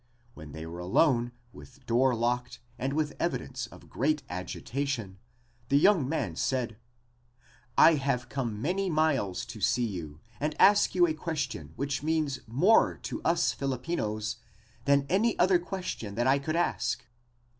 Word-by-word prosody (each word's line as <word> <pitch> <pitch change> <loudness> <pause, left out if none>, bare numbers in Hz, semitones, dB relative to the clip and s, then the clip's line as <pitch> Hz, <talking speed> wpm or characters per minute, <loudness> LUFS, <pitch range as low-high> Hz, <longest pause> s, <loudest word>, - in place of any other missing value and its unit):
When 75 -6 -11
they 80 +2 -7
were 85 +2 -7
alone 120 - +2 0.2
with 135 0 -15
door 125 +2 +3
locked 125 +1 -1 0.2
and 135 +2 -1
with 150 0 0
evidence 130 -7 -2
of - - -15
great 150 +3 0
agitation 105 +3 -4 0.5
the 140 - +4
young 170 -4 +4
man 120 - -2
said: 120 +1 -1 1.0
"I 165 - +8
have 125 -3 -1
come 120 -5 -3
many 185 - 0
miles 150 - +1
to 110 - -9
see 120 +5 +2
you 80 -8 -6 0.2
and 150 +1 -2
ask 205 -1 +5
you 175 -1 +6
a 160 - 0
question 155 - -4
that 140 0 -2
means 155 -3 0
more 175 - +4
to - - -4
us 170 0 +2
Filipinos 125 -6 -2 0.5
than 140 0 +3
any 210 +7 +2
other 180 0 +4
question 180 - -5
that 120 - 0
I 135 +2 +4
could 155 +3 -3
ask." 125 -7 0
135 Hz, 150 wpm, -29 LUFS, 115-155 Hz, 1.0 s, I